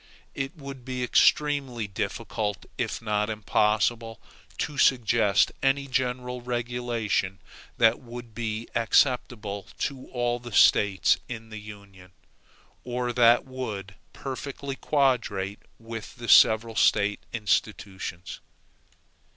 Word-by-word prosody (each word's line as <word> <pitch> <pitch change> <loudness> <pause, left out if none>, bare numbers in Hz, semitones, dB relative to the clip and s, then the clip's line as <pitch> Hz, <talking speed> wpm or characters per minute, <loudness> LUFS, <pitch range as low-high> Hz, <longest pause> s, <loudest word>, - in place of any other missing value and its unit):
It 135 +3 -4
would 140 -3 -9
be 125 0 -4
extremely 135 -3 +2
difficult, 105 +1 -3
if - - -3
not 105 -1 0
impossible, 110 +1 0 0.4
to 145 -2 -3
suggest 115 -5 +3
any 135 +1 +2
general 125 -1 -2
regulation 120 -5 -2 0.4
that 115 0 +4
would 120 -2 -10
be 110 0 -4
acceptable 115 -4 +1
to 135 -3 -4
all 120 -1 -1
the 120 -2 -10
States 100 -3 +5
in 115 -2 -7
the 110 - -6
Union, 100 -3 -13 0.7
or 125 0 -2
that 120 0 +5
would 110 -7 -6 0.2
perfectly 135 0 -6
quadrate 115 -10 0 0.2
with 115 -1 -8
the 120 -1 -8
several 110 0 +6
State 105 -1 +3
institutions. 100 -4 -2
115 Hz, 105 wpm, -26 LUFS, 105-125 Hz, 0.7 s, several